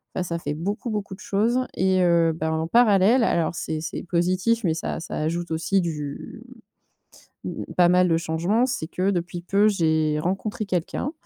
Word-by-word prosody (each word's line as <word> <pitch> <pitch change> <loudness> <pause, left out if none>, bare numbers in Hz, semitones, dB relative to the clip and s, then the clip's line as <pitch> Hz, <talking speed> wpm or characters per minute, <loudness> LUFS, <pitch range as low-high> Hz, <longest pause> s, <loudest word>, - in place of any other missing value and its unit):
Bah, 185 - -1
ça 170 -1 -3
fait 145 -2 -4
beaucoup, 205 +8 -3
beaucoup 205 -3 -4
de - - -22
choses 225 +5 +1 0.2
et 185 0 +2
heu, 170 -1 +3
bah, 160 0 -2
en 160 0 -1
parallèle, 230 +2 +4
alors, 170 -6 +1
c'est 155 -1 -3
c'est 160 - -5
positif 185 +6 0
mais 165 -3 +2
ça 165 - -4
ça 165 - -6
ajoute 165 +2 -2
aussi 165 +4 +1
du, 150 -4 -5 1.0
mmh, - - -6
pas 175 -1 +5
mal 180 0 +4
de 165 - +3
changement, 170 +9 0
c'est 205 -11 -3
que, 185 +2 0
depuis 175 0 -3
peu, 200 +3 +3
j'ai 160 -5 +1
rencontré 195 +4 -3
quelqu'un, 185 - -2
175 Hz, 180 wpm, -24 LUFS, 165-200 Hz, 1.0 s, pas